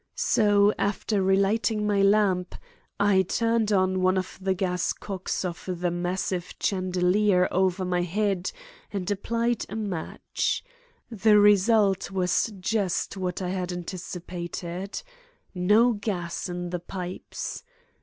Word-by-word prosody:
So 205 -1 +3
after 205 0 0
relighting 200 +3 +2
my 205 -1 +2
lamp, 195 -3 +2 0.4
I 200 -2 +4
turned 230 +3 +1
on 185 -1 +2
one 185 +1 +3
of 185 0 -4
the 190 0 0
gas 180 -1 0
cocks 190 -1 -4
of 175 0 -5
the 175 -1 0
massive 180 +1 -2
chandelier 185 0 +2
over 185 0 +1
my 180 -1 0
head 190 +1 -1 0.4
and 195 -1 -3
applied 230 +3 0
a 210 - -6
match. 200 -7 -2 0.5
The 215 -1 +4
result 205 -1 +4
was 190 +3 +1
just 195 -1 -1
what 185 -1 -3
I 180 - -2
anticipated; 180 0 -5 0.5
no 210 +6 +4
gas 185 -5 -3
in 175 0 -4
the 180 - -2
pipes. 180 +1 -6
190 Hz, 120 wpm, -26 LUFS, 180-205 Hz, 0.5 s, I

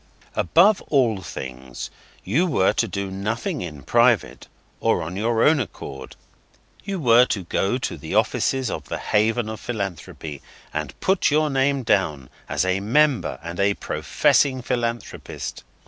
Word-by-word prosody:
Above 190 - +4
all 120 -9 +2
things, 65 -6 -7 0.3
you 150 - +1
were 105 - +2
to 115 - +1
do 100 0 -4
nothing 115 - -3
in 75 -5 -7
private, - - +2 0.3
or - - +1
on 85 +3 -6
your 115 +3 +1
own 155 0 +5
account. 70 - -7 0.7
You 195 -2 -3
were 120 -3 +6
to 100 -6 -2
go 95 +6 0
to 130 - -4
the - - -5
offices 130 -5 +1
of - - -5
the - - -2
Haven 110 +2 +1
of 110 0 -5
Philanthropy, 95 - -5 0.3
and 75 -3 -4
put 190 0 +2
your 155 0 +2
name 135 0 +1
down 75 - 0 0.2
as - - +1
a 95 +1 +1
Member 125 - +2
and 85 +2 -6
a 100 0 +3
Professing 130 -3 +1
Philanthropist. 120 -2 -4
110 Hz, 145 wpm, -23 LUFS, 90-135 Hz, 0.7 s, were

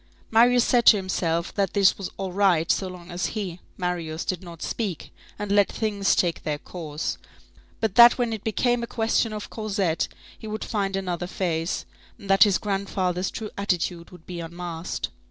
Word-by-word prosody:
Marius 240 +2 +5
said 240 -1 +2
to 215 - +9
himself 170 -3 -1
that 200 0 -1
it 195 -1 +6
was 195 - -5
all 190 -1 -3
right 180 -4 +3
so 190 - 0
long 180 -2 -10
as 175 +2 -1
he, 185 -4 -4 0.2
Marius, 170 -3 -3
did 185 -2 -2
not 170 -3 -9
speak, 200 -9 -4 0.2
and 205 -1 -4
let 205 -1 +4
things 205 -3 +1
take 170 -3 +1
their 150 -1 -2
course; 155 -1 -5 0.6
but 220 -4 0
that 240 +2 +8
when 240 -2 0
it 220 - -5
became 240 +2 +1
a 235 - -3
question 225 0 +1
of 210 -1 -6
Cosette, 200 -6 -1 0.3
he 220 - -8
would 215 0 -4
find 195 -3 -1
another 180 -2 -2
face, 170 -2 -2 0.3
and 200 -4 -4
that 195 0 +8
his 200 -3 +3
grandfather's 195 -2 -1
true 215 -1 -6
attitude 175 -3 -1
would 180 -3 -15
be 175 -1 -6
unmasked. 170 0 -5
190 Hz, 180 wpm, -25 LUFS, 175-210 Hz, 0.6 s, to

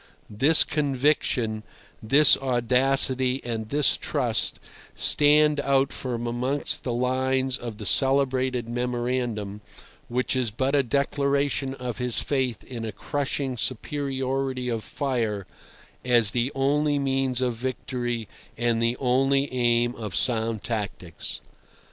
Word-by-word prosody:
This 140 +10 +6
conviction, 135 -6 0 0.4
this 140 +6 +6
audacity 130 +1 +2
and 110 -2 -5
this 145 +2 +3
trust 125 -7 0 0.4
stand 150 0 +4
out 140 -1 +1
from 120 -2 -4
amongst 125 +4 -1
the 125 - -3
lines 130 +1 0
of 115 -5 -7
the 105 - -8
celebrated 130 -1 +2
memorandum, 120 -4 -3 0.5
which 125 +2 -1
is 125 -3 0
but 130 +6 -2
a 145 - +4
declaration 140 +1 -1
of 125 -2 -6
his 125 -1 0
faith 130 -5 -2
in 120 -3 -7
a 110 - -4
crushing 135 +4 -3
superiority 130 0 -2
of 115 -2 -3
fire 120 -8 -3 0.6
as 120 -4 +3
the 120 +3 -1
only 145 +2 +1
means 135 -2 0
of 125 -2 0
victory 120 -1 -4 0.3
and 120 -1 0
the 115 +1 0
only 135 +2 +1
aim 120 -1 +1
of 105 -6 -6
sound 115 -3 +1
tactics. 100 -6 -5
130 Hz, 120 wpm, -25 LUFS, 120-135 Hz, 0.6 s, This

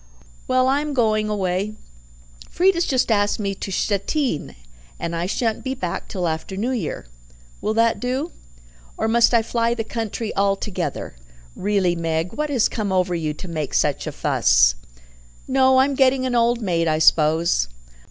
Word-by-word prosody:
"Well, 255 0 +3
I 275 +2 +2
am 300 -1 -4
going 215 -3 +1
away. 200 +1 -1 0.7
Frieda's 350 0 +2
just 255 -3 +1
asked 205 -1 +2
me 200 -2 -1
to 195 - -6
Stettin, 205 - -1 0.4
and 170 - -3
I 170 +2 -2
shan't 225 +2 -1
be 265 0 -3
back 180 -8 -4
till 180 -3 -2
after 160 +4 -4
the - - -5
New 240 +5 -1
Year. 225 -12 -3 0.6
Will 215 +1 -1
that 230 0 +2
do? 260 +6 -2 0.7
Or - - 0
must 235 +1 +4
I 230 -2 +3
fly 230 +1 0
the 225 - -2
country 225 0 -4
altogether? 195 - -2 0.4
Really, 195 -3 +1
Meg, 165 +1 -2
what 300 +1 -2
has 255 -6 +2
come 210 -4 -3
over 185 -1 +1
you 155 -3 -2
to 185 - -8
make 155 -4 -4
such - - +1
a - - -2
fuss?" - - +3 0.7
"Oh, 260 0 +4
I'm 270 +2 +3
getting 265 -1 +3
an 255 - -1
old 235 0 +2
maid, 170 -4 0
I 155 -1 +2
suppose. 155 - +3
215 Hz, 170 wpm, -22 LUFS, 180-250 Hz, 0.7 s, must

